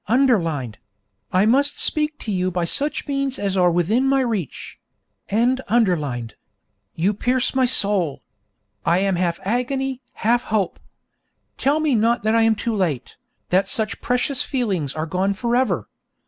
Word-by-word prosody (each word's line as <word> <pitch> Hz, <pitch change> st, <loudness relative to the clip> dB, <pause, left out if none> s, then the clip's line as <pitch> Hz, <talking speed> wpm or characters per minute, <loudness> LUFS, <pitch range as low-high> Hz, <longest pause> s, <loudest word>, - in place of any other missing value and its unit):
[underlined: 170 Hz, -, +1 dB, 0.5 s
I 185 Hz, +2 st, +3 dB
must 275 Hz, +6 st, +2 dB
speak 300 Hz, -1 st, +1 dB
to 215 Hz, -, -4 dB
you 185 Hz, -1 st, 0 dB
by 175 Hz, -1 st, -1 dB
such 290 Hz, -, -1 dB
means 275 Hz, -2 st, -1 dB
as 200 Hz, -1 st, -2 dB
are 180 Hz, -2 st, +4 dB
within 190 Hz, +10 st, +1 dB
my 270 Hz, 0 st, +3 dB
reach.] 220 Hz, -, -4 dB, 0.5 s
You 160 Hz, -, -1 dB
pierce 250 Hz, +5 st, 0 dB
my 260 Hz, -1 st, +2 dB
soul. 200 Hz, -, +2 dB, 0.6 s
I 170 Hz, -, +2 dB
am 195 Hz, -1 st, +1 dB
half 170 Hz, -1 st, -1 dB
agony, 260 Hz, +4 st, -2 dB
half 235 Hz, +3 st, +1 dB
hope. 205 Hz, -4 st, -1 dB, 0.8 s
Tell 285 Hz, +3 st, +1 dB
me 310 Hz, -3 st, +1 dB
not 230 Hz, 0 st, +2 dB
that 220 Hz, +1 st, +2 dB
I 230 Hz, -, +4 dB
am 225 Hz, 0 st, +3 dB
too 230 Hz, +2 st, -2 dB
late, 165 Hz, -, -2 dB, 0.3 s
that 185 Hz, +2 st, +2 dB
such 220 Hz, -4 st, -1 dB
precious 250 Hz, +2 st, 0 dB
feelings 195 Hz, -, -2 dB
are 155 Hz, 0 st, -2 dB
gone 185 Hz, +4 st, -1 dB
for 235 Hz, +3 st, -1 dB
ever. 255 Hz, +1 st, 0 dB
215 Hz, 150 wpm, -21 LUFS, 175-255 Hz, 0.8 s, are